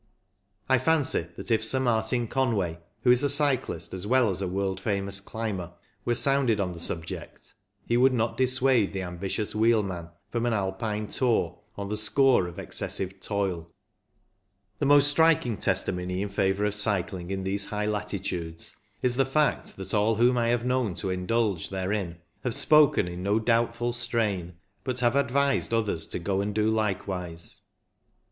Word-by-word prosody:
I 130 -1 +4
fancy 140 - +1
that - - -4
if 110 -1 +2
Sir 130 +4 +2
Martin 120 -1 +1
Conway, 105 -11 0 0.2
who 125 - +6
is 125 +1 +6
a 145 - +3
cyclist 140 -2 +1
as 95 +2 -4
well 125 -2 +3
as 95 +1 -3
a 95 - -1
world 95 0 -2
famous 100 -1 -2
climber, 100 -4 -5 0.3
were 120 - +1
sounded 125 -2 +2
on 95 -2 -1
the 85 - -9
subject, 80 -1 -4 0.3
he 120 - +1
would 130 +2 +5
not 115 -2 0
dissuade 130 -4 +2
the 95 -1 -3
ambitious 95 +4 -3
wheelman 105 -6 +1 0.2
from 120 0 -1
an 120 - +1
Alpine 105 +2 -2
tour 110 -8 0 0.2
on 100 -1 -5
the 105 - -2
score 120 -1 +3
of 85 - -10
excessive 95 0 -3
toil. 95 -5 -2 1.1
The 140 - +1
most 145 0 +6
striking 145 -5 +3
testimony 90 0 -1
in 100 - -4
favour 95 +1 0
of 105 - 0
cycling 95 -4 -1
in 95 0 -3
these 100 +1 -1
high 105 0 -3
latitudes 100 -6 -3 0.3
is 125 -1 +2
the 135 - +4
fact 150 +3 0
that 95 - -6
all 110 +1 +3
whom 120 +3 +4
I 120 -1 +1
have 120 0 +1
known 125 -7 0
to 95 - -2
indulge 95 0 0
therein 95 -2 -2 0.3
have 120 - 0
spoken 150 - +5
in 90 0 -6
no 100 +3 +1
doubtful 115 +1 +1
strain, 110 -7 -1 0.3
but 130 -1 -3
have 120 +1 +2
advised 140 0 +1
others 105 -8 0
to - - -4
go 95 +2 -1
and 100 0 -3
do 110 0 +2
likewise. 95 -6 -3
105 Hz, 165 wpm, -27 LUFS, 95-120 Hz, 1.1 s, who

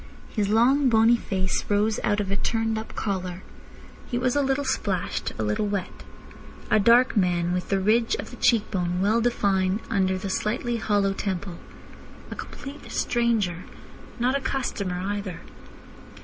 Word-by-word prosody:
His 205 -3 -1
long, 255 +5 +4
bony 225 +1 +5
face 190 -4 -1
rose 210 +1 +2
out 205 -1 +1
of 195 -2 -2
a - - +1
turned 225 +1 0
up 220 - -9
collar. 185 -3 -3 0.7
He 240 - -1
was 250 +1 +1
a 290 - +3
little 270 +1 0
splashed, 200 -8 -1
a 110 - -1
little 105 - 0
wet. 200 -3 -4 0.7
A 215 - +5
dark 235 +5 +5
man, 175 -3 +1
with 180 0 -3
the 195 - +2
ridge 225 - +2
of - - -7
the - - -9
cheek 225 -3 +2
bone 180 -2 -1
well 215 +4 +2
defined 200 -4 +1
under 190 -2 +1
the 190 - -5
slightly 235 +4 -1
hollow 205 -3 +1
temple. 190 -3 -4 0.7
A - - -4
complete 285 +1 -9
stranger. 220 -8 0 0.5
Not 250 +3 +2
a 280 - 0
customer 200 -10 -2
either. 200 -2 -4
205 Hz, 160 wpm, -25 LUFS, 190-235 Hz, 0.7 s, bony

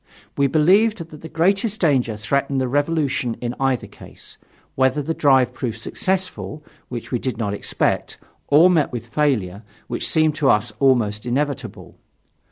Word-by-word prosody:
We 140 - +2
believed 190 +10 +3
that 150 - -11
the 160 - -9
greatest 195 +7 +1
danger 130 - +1
threatened 140 +5 -1
the 130 - 0
revolution 145 -3 0
in 120 0 -3
either 135 -2 0
case - - -14 0.3
whether 130 +2 +2
the 150 +3 -2
drive 130 -5 +3
proved 115 -3 -4
successful, 185 - -3 0.3
which 120 -2 -7
we 125 - 0
did 130 -1 -3
not 105 -3 -2
expect, 100 - -1 0.3
or 155 +5 +6
met 170 -5 +2
with 120 -2 -5
failure, 115 -8 -1 0.2
which - - -3
seemed 155 -1 +3
to 140 - +2
us 105 +3 +2
almost 120 -5 +2
inevitable. 140 +2 -3
135 Hz, 155 wpm, -21 LUFS, 120-155 Hz, 0.3 s, or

